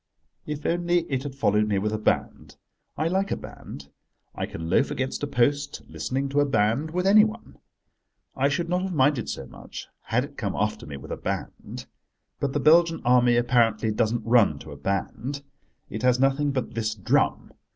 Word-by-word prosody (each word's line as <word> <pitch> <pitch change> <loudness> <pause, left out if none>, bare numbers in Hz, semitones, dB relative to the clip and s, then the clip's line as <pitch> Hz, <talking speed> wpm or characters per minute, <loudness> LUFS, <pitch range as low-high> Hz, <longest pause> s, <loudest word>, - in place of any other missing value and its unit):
If 150 0 -5
only 175 +1 +2
it 130 -1 0
had 140 -1 -6
followed 105 -5 +2
me 100 -2 +1
with 105 +2 -1
a 110 - -1
band: - - -1 0.4
I 155 - +1
like 190 +3 0
a - - -1
band. 70 0 -10 0.4
I - - -3
can 80 0 -6
loaf 115 +11 +2
against 130 -2 -3
a 145 - -1
post, 145 +2 0
listening 135 +2 -3
to 140 +1 +1
a 145 - +4
band 120 +4 +1
with 180 +3 -2
anyone. 215 +3 +3 0.8
I 135 +1 +2
should 170 +4 -1
not 180 +1 0
have 190 -2 -3
minded 135 -4 +2
so 70 - -5
much 65 - -10 0.2
had - - +1
it - - -10
come - - -2
after - - -2
me 70 -2 -6
with 65 - -10
a - - -3
band. - - -5 0.5
But 140 -1 -1
the 145 - +1
Belgian 165 +3 +4
Army, 125 -1 +5
apparently, 120 -2 +2
doesn't 110 +2 0
run 115 -10 +4
to 80 - -10
a - - -8
band. 110 - -3 0.4
It 110 - -6
has 125 0 +3
nothing 135 +2 +2
but 130 -4 -2
this 110 -1 -2
drum. 100 - 0
130 Hz, 190 wpm, -25 LUFS, 110-150 Hz, 0.8 s, Army